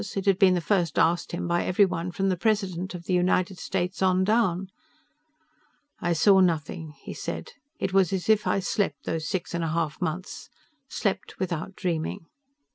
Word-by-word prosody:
It 195 - -2
had 195 -1 +3
been 190 -3 +6
the 175 - 0
first 175 -4 0
asked 170 +1 +2
him 175 - -3
by 175 0 +1
everyone 180 -2 +2
from 195 +2 0
the 185 - +2
president 190 -3 -1
of 170 -1 -8
the 185 - -1
United 180 +1 +1
States 185 0 -2
on 185 0 +3
down. 195 -3 +1 1.3
"I 175 - -1
saw 190 +4 +5
nothing," 160 -3 0
he - - -6
said. - - -5 0.3
"It 190 - -2
was 190 -3 +4
as 190 -2 -2
if 215 -1 +3
I 195 - +2
slept 185 -6 -1
those 160 -1 -3
six 185 -1 -3
and 170 -1 -1
a - - 0
half 160 +1 -2
months 180 +3 -4 0.4
slept 200 -2 -2
without 180 0 -3
dreaming." 165 -3 -2
180 Hz, 180 wpm, -26 LUFS, 170-195 Hz, 1.3 s, been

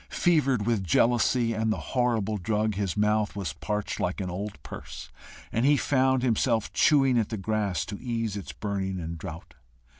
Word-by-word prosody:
Fevered 135 -10 +2
with 115 -4 +1
jealousy 115 +5 +2
and 110 0 0
the - - 0 0.2
horrible 115 -5 +1
drug, 105 +3 0
his 100 -1 -2
mouth 105 0 +1
was 95 -8 -3
parched 105 0 -3
like 90 +2 -1
an 90 -2 -3
old 100 +3 -5
purse, - - -9 0.4
and 115 - 0
he 145 +2 +5
found 130 -2 +2
himself 115 -2 +1
chewing 135 -5 +4
at 110 - -1
the 110 - -3
grass 105 -2 -1
to 100 - -7
ease 115 -4 -2
its 95 -8 -6
burning 95 -2 -3
and 85 0 -5
drought. 80 +1 -8
110 Hz, 175 wpm, -27 LUFS, 100-120 Hz, 0.4 s, he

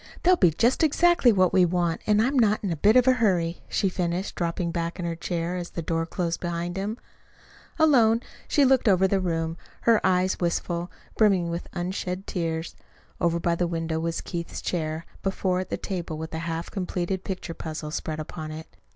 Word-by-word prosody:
"They'll 365 +1 +6
be 180 - +5
just 235 - +2
exactly 325 -3 +4
what 185 -4 +3
we 185 - +5
want, 175 -1 0
and 210 0 +4
I'm 265 +4 0
not 215 -2 +3
in 195 - -1
a - - 0
bit 205 +9 +4
of 255 0 +5
a 260 - +7
hurry," 180 -8 +1
she 195 - +1
finished, 180 0 -2
dropping 170 0 -2
back 170 0 -3
in 175 - -4
her 170 -1 -2
chair 170 +1 -3
as 175 -1 -5
the 170 - -5
door 165 +1 -1
closed 170 -2 -2
behind 175 0 -3
him. 205 +4 -3 0.8
Alone, 240 -8 +5 0.3
she 285 - +4
looked 260 -2 +3
about 190 -1 +5
the 195 - +3
room, 165 -2 -2 0.2
her 230 -2 +4
eyes 185 0 +2
wistful, 175 0 -1 0.3
brimming 190 -6 +3
with 170 +1 -4
unshed 180 +1 -3
tears. 165 -2 -3 0.4
Over 170 0 +1
by 170 0 +1
the 175 +1 0
window 165 -1 -2
was 165 0 -2
Keith's 170 -2 -5
chair, 160 -1 -2 0.2
before 190 -1 0
it 185 - -4
the - - -2
table, 175 -5 -4
with 160 +1 -6
a 160 - -2
half 165 +1 -4
completed 185 -1 -2
picture 185 -3 -5
puzzle 155 -2 -6
spread 155 -1 -4
upon 155 0 -6
it. 155 +1 -9
175 Hz, 195 wpm, -26 LUFS, 165-195 Hz, 0.8 s, a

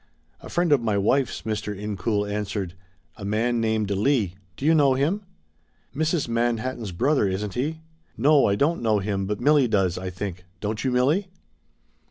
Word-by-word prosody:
"A - - -11
friend 175 -2 +1
of 140 -4 +5
my 110 -3 0
wife's," 125 +7 +1
Mr. 105 -2 -3
Incoul 105 0 -1
answered. 100 -3 -3 0.4
"A - - -9
man 115 +4 0
named 110 -2 0
Leigh 105 -2 +1 0.2
do 140 - -5
you 160 - +5
know 140 -4 +4
him?" 155 +10 0 0.7
"Mrs. 160 0 0
Manhattan's 115 -1 -1
brother, 130 - +2
isn't 95 +1 -3
he? 155 +7 -2 0.4
No, 145 +5 +5
I 100 - +2
don't 155 +9 +1
know 110 -2 +2
him, 100 -1 -2
but 105 +1 -2
Milly 145 0 +4
does, 95 -5 +1
I 95 0 -4
think. 90 0 -6 0.2
Don't 105 +2 -3
you, 130 - +1
Milly?" 145 +11 +2
110 Hz, 170 wpm, -24 LUFS, 100-140 Hz, 0.7 s, of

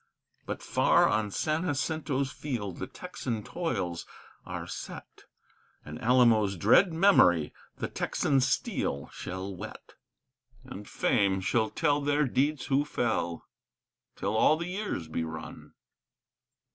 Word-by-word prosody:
But - - -5
far - - +4
on 105 -1 +1
San 155 - -1
Jacinto's 145 -3 -1
field 105 - -5
the - - -4
Texan 115 -4 -5
toils 100 - -3 0.4
are - - -5
set, - - -9 0.6
And 75 +1 -8
Alamo's 115 -5 +4
dread 120 - +5
memory 160 - +4 0.2
the - - -3
Texan 135 - 0
steel 70 - -1
shall 95 +1 -6
whet. - - -9 0.7
And 105 -6 -9
Fame 100 -5 +2
shall 110 +4 +1
tell 145 -3 +1
their 145 +1 +2
deeds 135 +2 0
who 140 +1 +2
fell 110 - -2 0.7
till 100 +2 -2
all 150 +7 +4
the 170 +2 -4
years 190 - -3
be 80 +1 -2
run. 80 -1 -8
120 Hz, 120 wpm, -29 LUFS, 95-145 Hz, 0.7 s, dread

